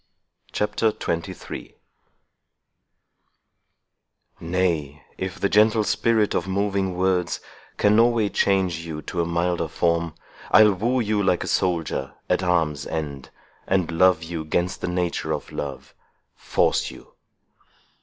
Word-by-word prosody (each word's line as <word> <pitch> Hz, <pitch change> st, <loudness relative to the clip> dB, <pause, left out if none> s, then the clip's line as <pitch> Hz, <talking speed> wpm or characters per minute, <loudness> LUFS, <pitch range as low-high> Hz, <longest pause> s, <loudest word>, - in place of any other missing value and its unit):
CHAPTER 105 Hz, +2 st, +1 dB
XXIII 85 Hz, -6 st, -5 dB, 2.6 s
Nay, 80 Hz, -5 st, -1 dB, 0.2 s
if 95 Hz, 0 st, -4 dB
the -, -, +2 dB
gentle 110 Hz, +2 st, +4 dB
spirit 110 Hz, 0 st, +2 dB
of 90 Hz, -, -1 dB
moving 95 Hz, -1 st, 0 dB
words 90 Hz, -1 st, +1 dB, 0.4 s
Can 105 Hz, +1 st, +4 dB
no 115 Hz, +1 st, +7 dB
way 115 Hz, -3 st, +1 dB
change 95 Hz, -3 st, +1 dB
you 80 Hz, -2 st, -6 dB
to 85 Hz, -, -2 dB
a -, -, 0 dB
milder 85 Hz, 0 st, 0 dB
form, 85 Hz, 0 st, 0 dB, 0.3 s
I'll 105 Hz, -1 st, +7 dB
woo 120 Hz, +7 st, 0 dB
you, 105 Hz, -2 st, 0 dB
like 95 Hz, -3 st, +1 dB
a -, -, -6 dB
soldier, 85 Hz, -7 st, -1 dB
at -, -, +1 dB
arms' 80 Hz, -6 st, 0 dB
end, 70 Hz, -4 st, -5 dB, 0.4 s
And 95 Hz, -3 st, +1 dB
love 85 Hz, 0 st, +4 dB
you 80 Hz, -1 st, -4 dB
'gainst 85 Hz, +4 st, -1 dB
the -, -, -2 dB
nature 90 Hz, -1 st, -1 dB
of -, -, -5 dB
love, 70 Hz, -2 st, -6 dB, 0.4 s
force -, -, +1 dB
you. -, -, -14 dB
90 Hz, 125 wpm, -24 LUFS, 85-100 Hz, 2.6 s, no